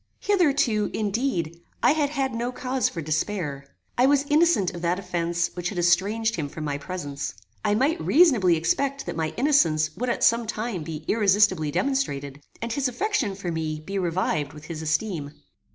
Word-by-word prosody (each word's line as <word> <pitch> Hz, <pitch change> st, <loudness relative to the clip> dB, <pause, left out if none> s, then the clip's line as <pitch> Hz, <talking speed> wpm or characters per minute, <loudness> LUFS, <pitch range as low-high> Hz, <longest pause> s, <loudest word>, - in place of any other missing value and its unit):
Hitherto, 285 Hz, -, +2 dB
indeed, 200 Hz, -, -1 dB, 0.2 s
I -, -, +6 dB
had 295 Hz, -2 st, +1 dB
had 270 Hz, -3 st, -1 dB
no 240 Hz, +2 st, -2 dB
cause 255 Hz, 0 st, -1 dB
for 165 Hz, -, -6 dB
despair. 155 Hz, -3 st, -2 dB, 0.3 s
I 255 Hz, -, +6 dB
was 285 Hz, 0 st, +3 dB
innocent 300 Hz, -, +3 dB
of 175 Hz, -, -7 dB
that 175 Hz, +1 st, +1 dB
offence 170 Hz, -2 st, -1 dB
which 175 Hz, 0 st, -3 dB
had 200 Hz, -, -7 dB
estranged 200 Hz, +6 st, +2 dB
him 145 Hz, -3 st, -3 dB
from 155 Hz, -, -7 dB
my 145 Hz, -1 st, -2 dB
presence. 145 Hz, -, -5 dB, 0.3 s
I 205 Hz, -, +2 dB
might 290 Hz, +9 st, +1 dB
reasonably 250 Hz, -, +5 dB
expect 275 Hz, +12 st, 0 dB
that -, -, -4 dB
my 160 Hz, -1 st, -1 dB
innocence 165 Hz, -, +3 dB
would 250 Hz, +2 st, -2 dB
at -, -, -1 dB
some 230 Hz, 0 st, +3 dB
time 220 Hz, -4 st, -3 dB
be 155 Hz, 0 st, -6 dB
irresistably 200 Hz, -6 st, +3 dB
demonstrated, 145 Hz, -, -1 dB, 0.2 s
and 230 Hz, -1 st, -2 dB
his 275 Hz, +1 st, 0 dB
affection 250 Hz, -, -1 dB
for 190 Hz, -3 st, -4 dB
me 155 Hz, -1 st, -3 dB
be 195 Hz, +6 st, -4 dB
revived 165 Hz, -4 st, -1 dB
with 150 Hz, 0 st, -11 dB
his 160 Hz, -1 st, -6 dB
esteem. 160 Hz, -2 st, -2 dB
190 Hz, 175 wpm, -25 LUFS, 160-250 Hz, 0.3 s, I